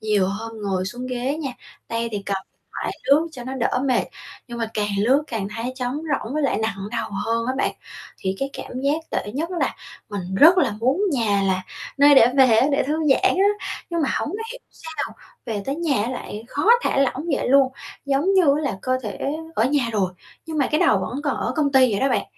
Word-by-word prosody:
nhiều 210 -3 +2
hôm 225 +3 -5
ngồi 190 -2 -1
xuống 245 +5 -5
ghế 255 +3 -2
nha, 300 -4 -3 0.4
tay 230 0 -1
thì 205 -1 -3
cầm 200 - 0 0.2
điện - - -46 0.2
thoại - - -2
lướt 305 +4 +4
cho 250 -5 -8
nó 260 +2 -5
đỡ 250 0 0
mệt, 255 -3 +2 0.4
nhưng 240 0 -6
mà 225 -1 -2
càng 210 -1 0
lướt 260 +8 +3
càng 220 -7 -3
thấy 240 +3 -3
trống 250 -1 -2
rỗng 290 -5 -3
với 305 - 0
lại 275 - +1
nặng 220 -2 -1 0.2
đầu 230 -1 -2 0.2
hơn 230 +1 0
á 255 - 0
bạn. - - +1 0.5
Thì 190 0 -2
cái 275 0 -1
cảm 255 - -6
giác 285 +4 +1
tệ 205 - -3
nhất 325 +5 -2
là 360 - -1 0.3
mình 190 -3 -5
rất 330 - +7
là 280 -10 +3
muốn 265 - +2
nhà 210 -6 +1
là 185 0 0 0.4
nơi 285 +1 +7
để 245 -4 +8
về 250 -4 +6
á, 260 - +4
để 280 - +3
thư 295 - -1 0.2
giãn 380 +7 +3
á, 405 +2 +2 0.2
nhưng 335 -2 0
mà 275 - +1
hổng - - -2
có 415 +5 -4
hiểu - - -9
sao 320 -2 -6 0.3
về 210 -3 -3
tới 275 - -1
nhà 305 -10 +1
á 235 - -2
lại 220 -4 -6
khó 290 - -2 0.2
thả - - 0
lỏng 275 +3 +1
vậy - - -2
luôn, 270 0 +5 0.3
giống 280 +7 +2
như 380 - +6
á - - -1
là 270 -10 -2
cơ 255 0 +1
thể 210 -2 -5 0.4
ở 220 - +2
nhà 260 -2 +1
rồi, 190 -4 0 0.3
nhưng 320 -1 -3
mà 275 - +3
cái 305 - +1
đầu 205 - +4
vẫn 250 +9 -4
còn 285 - 0
ở - - -2
công 285 -2 +1
ty 260 -2 +6
vậy 200 - 0
đó 270 - +3
bạn, - - +1
255 Hz, 240 wpm, -22 LUFS, 220-290 Hz, 0.5 s, để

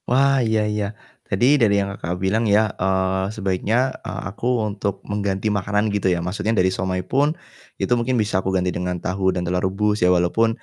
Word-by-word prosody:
Wah 135 +2 +4
iya 110 -1 +2
iya, 105 -1 -1 0.4
tadi 95 +5 +2 0.2
dari 105 -3 +4
yang 100 0 0
Kakak, 85 -3 -4
bilang 110 +4 +1
ya, 105 +1 +5 0.2
eee, 95 0 +1
sebaiknya, 100 +2 0 0.2
eee, - - -5
aku - - -7 0.2
untuk 100 -1 -2
mengganti 100 0 -2
makanan 105 +1 0
gitu 100 -2 +1
ya, 90 -1 +1
maksudnya 105 +4 -1
dari 95 0 +3
siomay 95 -1 -2
pun 145 - +1 0.4
itu - - +1
mungkin 120 +1 +1
bisa 105 -4 +1
aku 95 - -2
ganti 90 0 0
dengan 90 0 -2
tahu 95 +2 -1
dan 90 -1 -2
telur 90 +1 0
rebus 105 +3 0
ya, 90 - +4
walaupun 90 +6 +3
100 Hz, 190 wpm, -22 LUFS, 95-110 Hz, 0.4 s, ya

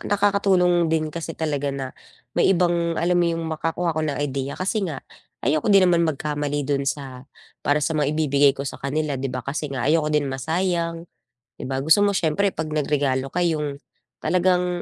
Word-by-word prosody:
nakakatulong 195 -4 +2
din 155 -1 0
kasi 165 -1 -5
talaga 145 -3 -1
na 135 -2 -4 0.4
may - - +3
ibang 170 -2 +2
alam 175 +1 +1
mo 175 - +3
'yong 165 0 -2
makakuha 165 +2 -1
ko 155 - -2
ng 150 -2 -1
ideya, 140 -1 -3
kasi 195 +4 -1
nga, 150 -5 -6 0.4
ayoko 150 - +1
din 195 -2 +6
naman 170 -2 +3
magkamali 145 -1 -2
do'n 140 0 0
sa 135 -3 -5 0.4
para 145 +1 +2
sa - - 0
mga 150 -3 +1
ibibigay 140 -2 +4
ko 140 - -4
sa 135 - -6
kanila, 145 0 -2
di 135 - -2
ba, 125 -1 -5
kasi 150 +2 -3
nga 135 -3 -3
ayoko 155 0 +2
din 150 -1 +1
masayang 165 +4 -1 0.5
'di - - -7
ba 135 - -1
gusto 160 +8 +5
mo 200 - +2
s'yempre 175 +5 +1
pag 160 - -3
nagregalo 140 -3 0
ka 180 - 0
'yong 150 -4 -1 0.4
talagang 180 -1 +1
155 Hz, 185 wpm, -23 LUFS, 140-175 Hz, 0.5 s, din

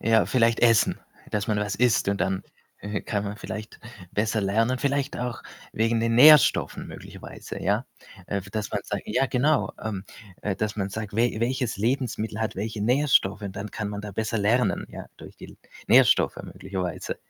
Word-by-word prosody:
Ja, 110 0 +3
vielleicht 115 -2 +2
essen. 115 -2 +4 0.3
Dass 105 0 -1
man 105 -1 0
was 105 -1 -1
isst 120 -4 +2
und 100 0 -1
dann, 95 +1 0 0.4
äh, 105 0 -4
kann 105 -2 -2
man 100 +1 -5
vielleicht 110 0 -7 0.3
besser 110 +1 0
lernen. 115 +6 +1
Vielleicht 140 0 -1
auch 120 -1 -4 0.3
wegen 115 +1 +1
den 115 0 +1
Nährstoffen 150 +3 +6
möglicherweise, - - -9
ja. 105 +6 0 0.4
Äh, 100 - -2
dass 105 -2 -3
man - - -1
sagt - - -4
ja 135 - +1
genau, 140 +5 +1
ähm, 100 -3 -4 0.4
äh, 100 -2 -2
dass 110 0 -2
man 100 -2 -1
sagt: 105 0 -5
„We 115 0 +1
welches 125 0 -1
Lebensmittel 110 -1 -1
hat 110 - -2
welche 105 +1 -3
Nährstoffe?” 125 -5 +3
Und 100 -1 -6
dann 105 +1 -5
kann 105 -1 -4
man 105 0 -5
da 105 -1 -7
besser 110 +3 -2
lernen, 115 +5 +1
ja, - - -8
durch - - -13
die - - -10
L - - -16 0.3
Nährstoffe - - +5
möglicherweise. 95 -3 -5
110 Hz, 180 wpm, -25 LUFS, 100-120 Hz, 0.4 s, Nährstoffen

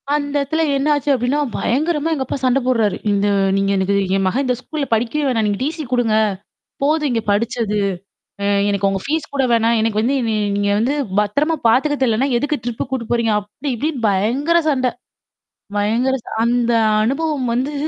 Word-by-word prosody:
அந்த 285 -1 -2
இடத்துல 315 +4 -1
என்னாச்சு 290 +1 +1
அப்படின்னா 255 +3 0 0.2
பயங்கரமா 305 +5 0
எங்க 275 -4 -1
அப்பா 260 - -3
சண்ட 255 +1 +3
போடுறாரு. 230 -5 +1 0.2
இந்த 200 0 +1 0.3
நீங்க 195 0 +1
எனக்கு 190 +1 +1 0.2
"என் 195 -1 +1
மகன் 265 +9 0
இந்த 250 -1 +1
ஸ்கூல்ல 290 +3 -4
படிக்கவே 240 +7 0
வேணாம். 230 -4 +1
நீங்க 205 -1 -1
டிசி 310 +3 -3
குடுங்க. 240 -3 +2 0.7
போதும் 300 0 +1
இங்க 230 -1 0
படிச்சது. 220 0 0 0.7
அ - - -1 0.2
எனக்கு 200 -1 +1
உங்க 195 0 -1
ஃபீஸ் 310 +2 -2
கூட 275 - +1
வேணாம். 230 0 +3
எனக்கு 220 -1 +1
வந்து 245 +5 +1
நீ - - 0 0.2
நீங்க 205 0 0
வந்து 245 +6 +1 0.3
பத்திரமா 285 +11 0
பார்த்துக்கத் 285 +5 +2
தெரியலைன்னா, 250 +2 +2
எதுக்கு 290 +4 -1
ட்ரிப்பு 240 -2 -3
கூட்டிட்டு 240 -4 -3
போறீங்க?" 235 -2 +1
அப்டி 210 +8 -7
இப்டின்னு 275 -1 -3
பயங்கர 245 - +1
சண்டை. 255 -4 +1 0.9
பயங்கர 230 +6 +1
ச - - -26 0.2
அந்த 240 0 +1 0.3
அனுபவம் 275 +2 -1
வந்து, 260 +5 -1
250 Hz, 170 wpm, -19 LUFS, 220-285 Hz, 0.9 s, சண்ட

